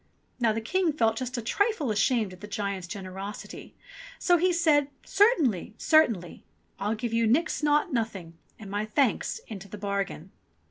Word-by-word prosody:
Now 235 -3 +3
the 225 +1 -2
King 350 +9 +1
felt 225 -6 +2
just 255 0 -3
a 235 - -3
trifle 355 - 0
ashamed 215 -1 +1
at 180 - -14
the 210 - -7
giant's 200 -3 -3
generosity; 195 +2 -8 0.4
so 350 -1 +3
he 360 +2 +3
said, 310 -5 +3 0.2
"Certainly, 310 - +2
certainly. 230 - +2 0.4
I'll 205 +3 -1
give 230 +1 -4
you 230 0 +2
nix 315 +9 +1
naught 295 -1 +2
nothing 205 -8 -3 0.2
and 200 -3 -10
my 205 +1 -1
thanks 250 - 0
into 200 -3 -8
the 210 - -8
bargain." 200 -3 -3
225 Hz, 165 wpm, -27 LUFS, 200-295 Hz, 0.4 s, Now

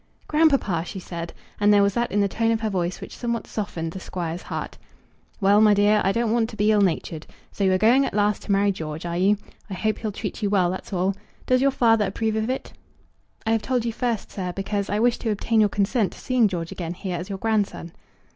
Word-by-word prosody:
"Grandpapa!" 275 - +2
she 185 - -7
said; 170 -2 -6 0.3
and 205 0 +4
there 205 -1 +6
was 200 0 +2
that 240 +2 -1
in 205 - +2
the 200 - +3
tone 225 +3 0
of 225 -1 +1
her 220 -1 -1
voice 180 -1 -2
which - - -9
somewhat 235 -1 -3
softened 170 -6 -4
the 190 - -7
Squire's 175 -2 -4
heart. - - -6 0.6
"Well, 205 +1 +5
my 210 -1 +6
dear, 205 +1 +4
I 195 - +3
don't 230 +1 0
want 230 -1 +1
to 220 - -9
be 210 +1 +2
ill 210 -1 +4
natured. 165 -4 -1 0.2
So 200 - -3
you 190 - +4
are - - +3
going 235 +8 +4
at - - -6
last 210 0 +1
to - - -4
marry 200 +1 +3
George, 160 -3 -6
are 170 0 -3
you? 200 +3 +3 0.3
I 190 - -4
hope 215 +3 -1
he'll 215 -2 -3
treat 205 0 -5
you 205 - +1
well; 185 -3 +2
that's 185 - -7
all. 190 +1 0 0.3
Does 255 0 +3
your 275 - +4
father 225 -5 +3
approve 220 +3 -1
of 220 +2 -1
it?" 260 - -4 0.7
"I 220 - +1
have 225 -1 +2
told 250 -1 -1
you 230 - -1
first, 235 -2 -2
sir; 180 -2 -4
because 200 +1 -2
I 205 - 0
wish 240 +1 +2
to 225 - -2
obtain 220 +2 +1
your 210 -1 +5
consent 205 +2 0
to - - -13
seeing 250 -4 +2
George 170 -4 -4
again 175 -1 -5
here 180 -1 -4
as 175 +4 -6
your 195 - -3
grandson." 205 -5 -1
205 Hz, 245 wpm, -24 LUFS, 185-225 Hz, 0.7 s, there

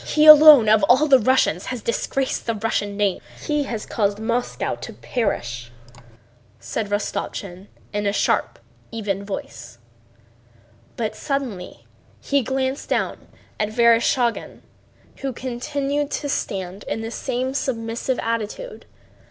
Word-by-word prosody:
He 305 0 +2
alone 305 -6 +10
of 215 0 +5
all 260 +7 +5
the 270 -3 +6
Russians 225 -7 +2
has 250 -4 -5
disgraced 260 +3 -2
the 230 - 0
Russian 205 -2 -2
name, 205 -3 0 0.2
he 295 - -1
has 225 -5 -5
caused 205 -2 0
Moscow 235 +3 -2
to - - -8
perish," 120 - -3 0.9
said 220 -3 -4
Rostopchín 200 -2 -4 0.3
in 205 0 -1
a - - +2
sharp, - - 0 0.3
even 200 -4 -3
voice, 120 - -7 1.2
but 220 -2 -2
suddenly 255 -11 -4 0.3
he 280 0 +1
glanced 265 +2 -2
down - - -2 0.3
at 210 - 0
Vereshchágin 235 +1 +2 0.6
who 275 - -3
continued 275 +4 -3
to 290 - -3
stand 190 -7 -3
in 225 - -3
the 225 0 -5
same 255 +1 -3
submissive 235 -1 -2
attitude. 230 - -4
230 Hz, 125 wpm, -22 LUFS, 205-265 Hz, 1.2 s, alone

